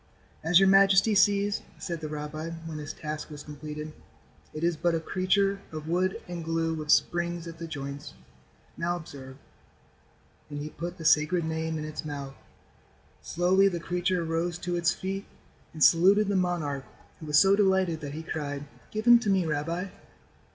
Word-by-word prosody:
"As 165 +2 +5
your 195 - +5
majesty 195 +2 +5
sees," 200 0 +3 0.2
said 170 -3 -5
the 155 - -4
rabbi, 150 +2 -5 0.2
when 160 -2 -5
his 145 -1 -5
task 155 0 -6
was 150 -1 -9
completed, 150 +1 -7 0.6
"it 155 - -6
is 170 0 +2
but 170 +1 +1
a - - 0
creature 195 +4 +1
of 155 -1 -7
wood 185 +3 0
and 175 -1 -5
glue 165 0 -1
with 155 -1 -6
springs 175 +1 +2
at 165 0 -9
the 165 - -5
joints. 140 - -7 0.6
Now 175 +1 -1
observe," 135 -6 -9 1.1
and 145 - -6
he 150 +1 -5
put 175 +2 -6
the 165 - -8
Sacred 155 +2 +3
Name 160 0 -2
in 155 - -4
its 155 +1 -6
mouth. 140 -2 -6 0.9
Slowly 185 +3 +3
the 175 -3 -1
creature 180 +1 -1
rose 165 +1 -1
to 175 0 -3
its 175 0 +2
feet 195 +1 -4 0.4
and 155 -2 -1
saluted 195 +5 +5
the 200 - +1
monarch 165 -7 -1 0.3
who 155 - -9
was 150 0 +3
so 195 +4 +6
delighted 190 -5 +2
that 145 -1 -6
he 160 - -6
cried: 145 -3 -4 0.2
"Give 215 +1 -4
him 240 0 +8
to 220 - -2
me, 190 -3 +3
rabbi." 165 +5 -2
165 Hz, 175 wpm, -28 LUFS, 155-185 Hz, 1.1 s, him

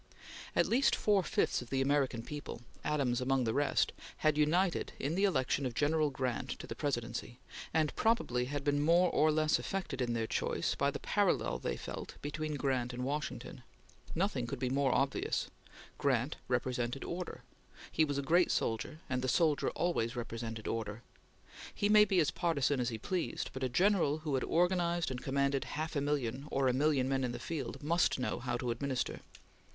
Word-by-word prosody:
At - - +4
least 260 +4 +3
four 205 -2 +3
fifths 165 - 0
of 120 - -10
the 135 - 0
American 135 -4 +1
people 145 -3 -7 0.2
Adams 135 -5 +1
among 130 0 +2
the 110 -2 0
rest 145 +2 +2 0.3
had 155 -1 +5
united 170 +4 +2
in 140 +4 -2
the 195 +4 +3
election 140 -6 +1
of 125 -3 -2
General 150 +2 +2
Grant 130 -3 -2
to - - -8
the - - -5
Presidency, 120 -3 -3 0.3
and 155 -2 +1
probably 170 - +1
had 140 +2 -3
been 145 0 +2
more 170 +3 +4
or 155 0 +4
less 155 0 +2
affected 185 -9 -3
in 120 -1 0
their 115 -1 0
choice - - -1
by - - +1
the - - -3
parallel - - +1
they - - -2
felt - - -7
between 150 +1 -3
Grant 130 -3 0
and 125 +1 -4
Washington. 145 +3 -4 0.5
Nothing 160 - 0
could 135 - -4
be 125 0 -1
more 135 -1 +2
obvious. 135 +1 0 0.5
Grant 135 0 +1
represented 125 0 -1
order. 175 +1 -5 0.5
He 160 - +3
was 145 -2 -1
a 140 - -1
great 170 +6 +4
soldier, 115 +8 -1
and 130 -1 -1
the 130 - -1
soldier 150 +3 +2
always 130 -10 -1
represented 115 -2 -5
order. 110 0 -3 0.7
He 205 - +1
might 210 -1 +7
be 190 - +3
as 155 - +3
partisan 145 -5 +1
as 120 - +1
he 115 - -4
pleased, 175 - -2
but 130 - -6
a 130 - 0
general 175 - +3
who 150 -3 -2
had 130 - +1
organized 175 -2 +1
and 125 -1 -4
commanded 140 0 0
half 155 +1 -3
a 140 - +1
million 140 -2 -1
or 135 -1 +1
a 125 - +3
million 140 -1 +2
men 135 0 0
in 125 -1 -1
the - - -4
field, 150 -4 -5
must 170 +3 +2
know 125 - -2
how 120 -1 -2
to 120 -1 -2
administer. 130 +1 -2
140 Hz, 190 wpm, -33 LUFS, 125-155 Hz, 0.7 s, might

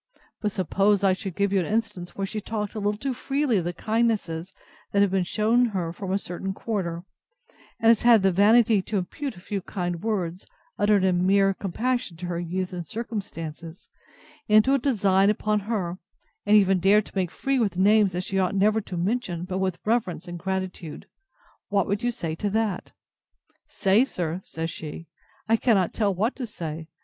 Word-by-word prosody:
But 210 - 0
suppose 195 +2 +1
I 195 -1 +5
could 190 -2 -6
give 200 -1 +1
you 195 - +4
an 175 - -1
instance, 210 -5 -2
where 195 - -2
she 215 +2 -4
has - - -13
talked 210 -2 -3
a 215 - -4
little 205 0 0
too 270 +4 -2
freely 270 -1 0
of 175 - -1
the 175 - -1
kindnesses 210 -5 -1 0.4
that 200 0 +4
have 200 - +1
been 190 -1 +2
shewn 220 +6 +2
her 185 -7 -2
from 190 +1 -5
a 195 - +2
certain 190 0 -5
quarter; 175 -7 -3 0.8
and 225 - +2
has 230 - +5
had 235 -4 +6
the 190 - +4
vanity 215 +3 +5
to 210 +2 -3
impute 260 +9 -4
a - - -12
few 200 +1 -4
kind 175 -3 -4
words, 185 -5 -2 0.3
uttered 205 -2 +3
in 185 -1 +2
mere 195 0 +4
compassion 220 +1 -2
to 180 - -6
her 175 -1 -3
youth 180 +2 -3
and 175 -2 -5
circumstances, 170 -8 -6 0.6
into 215 +5 +5
a 275 - +3
design 200 -7 +3
upon 210 0 +1
her, 195 -4 -3 0.5
and 210 +1 +7
even 195 -2 +4
dared 200 +3 +4
to - - -15
make 185 -3 0
free 270 +7 -1
with 205 -6 0
names 205 +1 +4
that 180 +1 -3
she 195 +1 -1
ought 185 +1 +1
never 210 +3 +3
to 185 -3 -7
mention 180 -2 -1
but 185 0 -3
with 185 -2 -1
reverence 210 -8 0
and 175 0 -6
gratitude; 185 -3 -4 0.6
what 200 -3 +2
would 200 +2 -1
you 245 - +1
say 170 -9 -3
to 205 +6 -2
that?—Say, 210 +1 -2
sir! 175 -7 -3
said 165 0 -5
she, 160 +2 -7 0.4
I 225 +1 +4
cannot 205 -7 +2
tell 210 -3 +1
what 210 +7 -1
to 255 -3 -4
say. 160 -5 -6
195 Hz, 195 wpm, -25 LUFS, 180-215 Hz, 0.8 s, and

